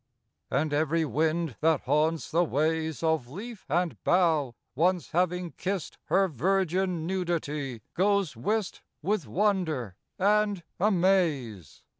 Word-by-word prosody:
And 155 Hz, 0 st, 0 dB
every 160 Hz, +2 st, +1 dB
wind 155 Hz, +1 st, 0 dB
that 160 Hz, -2 st, +3 dB
haunts 155 Hz, +4 st, 0 dB
the 170 Hz, +2 st, +3 dB
ways 160 Hz, +1 st, -1 dB
Of 160 Hz, -6 st, +1 dB
leaf 210 Hz, -, -8 dB
and 175 Hz, +3 st, -1 dB
bough, 160 Hz, -9 st, +2 dB, 0.2 s
once 170 Hz, +1 st, +1 dB
having 180 Hz, 0 st, 0 dB
kissed 190 Hz, -3 st, -4 dB
Her 195 Hz, 0 st, +3 dB
virgin 185 Hz, +2 st, 0 dB
nudity, 150 Hz, -, -2 dB
goes 195 Hz, -4 st, +1 dB
whist 210 Hz, -, -2 dB, 0.2 s
With 185 Hz, -, 0 dB
wonder 160 Hz, -, 0 dB, 0.2 s
and 205 Hz, -1 st, +2 dB, 0.2 s
amaze. 170 Hz, -, +1 dB
165 Hz, 115 wpm, -28 LUFS, 150-190 Hz, 0.2 s, that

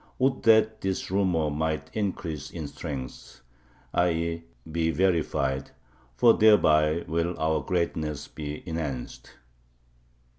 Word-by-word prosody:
Would 130 Hz, 0 st, +1 dB
that 110 Hz, -1 st, +4 dB
this 95 Hz, -1 st, -2 dB
rumor 90 Hz, -6 st, +1 dB
might 80 Hz, 0 st, -2 dB
increase 90 Hz, -7 st, -3 dB
in 80 Hz, -3 st, -6 dB
strength 65 Hz, -4 st, -7 dB, 0.5 s
[i. 90 Hz, 0 st, +3 dB
e. 85 Hz, 0 st, -2 dB, 0.3 s
be 80 Hz, 0 st, 0 dB
verified], 80 Hz, -6 st, 0 dB, 0.5 s
for 115 Hz, -, +6 dB
thereby 80 Hz, -7 st, +4 dB
will 85 Hz, +2 st, -1 dB
our 80 Hz, -1 st, +1 dB
greatness 75 Hz, -2 st, -2 dB
be 75 Hz, +1 st, -7 dB
enhanced! 75 Hz, -6 st, -5 dB
80 Hz, 110 wpm, -27 LUFS, 75-90 Hz, 0.5 s, for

